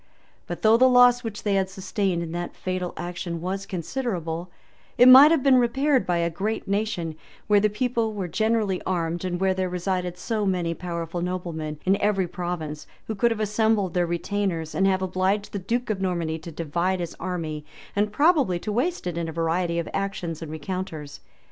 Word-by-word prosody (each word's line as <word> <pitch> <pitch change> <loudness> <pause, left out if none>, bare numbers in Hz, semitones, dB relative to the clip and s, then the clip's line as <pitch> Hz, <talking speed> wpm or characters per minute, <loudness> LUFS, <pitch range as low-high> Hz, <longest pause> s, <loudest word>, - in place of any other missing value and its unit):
But 175 -2 -6
though 220 +1 +6
the 260 +2 +6
loss 245 0 +6
which 220 -3 -6
they 205 - +1
had 190 -1 +1
sustained 190 -2 -2
in 165 - -6
that 175 +1 -4
fatal 185 -1 -3
action 175 -1 -4
was 195 +3 -4
considerable, 180 -4 -3 0.5
it 245 - +7
might 265 +4 +10
have 320 -5 +2
been 270 -2 +6
repaired 265 +3 +2
by 175 -1 +1
a 170 0 +1
great 210 +6 -3
nation; 195 -6 -1 0.3
where 210 -1 +4
the 210 +1 +3
people 230 +1 -1
were 200 -4 -4
generally 215 0 0
armed, 170 -1 -2
and 175 -1 -2
where 190 0 +2
there 185 -1 -1
resided 180 0 -2
so 215 +3 -2
many 180 -4 0
powerful 170 -1 -4
noblemen 170 -4 -4
in 195 +2 +2
every 195 -3 +2
province, 175 -4 -5 0.2
who 220 - -3
could 235 +3 +2
have 225 -2 -2
assembled 210 -2 +1
their 175 -1 +1
retainers, 175 -2 -2
and 195 - +2
have 190 -1 +1
obliged 190 +3 0
the 200 - -2
duke 235 +5 -1
of 195 -3 -3
Normandy 170 -4 -1
to 165 +2 -9
divide 170 +4 -1
his 170 -2 -4
army, 165 -4 -4 0.3
and 205 +1 +1
probably 285 - +3
to 210 +5 -4
waste 280 - -1
it 175 -1 -2
in 165 -1 -3
a - - -4
variety 170 +1 0
of 170 - -2
actions 185 -5 -3
and 160 -2 -6
rencounters. 160 -2 -5
185 Hz, 190 wpm, -25 LUFS, 170-210 Hz, 0.5 s, might